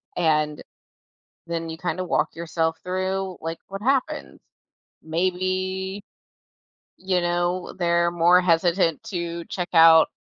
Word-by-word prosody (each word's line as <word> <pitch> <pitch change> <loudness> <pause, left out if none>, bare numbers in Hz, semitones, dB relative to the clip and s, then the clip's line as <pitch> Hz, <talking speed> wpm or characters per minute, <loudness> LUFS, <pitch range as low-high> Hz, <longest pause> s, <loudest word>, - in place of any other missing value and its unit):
And 155 -3 +1 0.9
then 165 -1 -3
you 160 - -6
kinda 180 +1 -3
walk - - -1
yourself 165 -1 -2
through, 185 0 -2
like, 165 +1 -5
"What 195 +1 -7
happen?" 265 0 -1 0.6
Maybe, 185 +3 -2 0.9
you 185 -1 0
know, 175 +1 -1
they're 170 -1 +1
more 175 +1 +4
hesitant 170 -1 +2
to 170 -5 -4
check 180 -2 -4
out 165 -1 +7
175 Hz, 110 wpm, -24 LUFS, 165-185 Hz, 0.9 s, out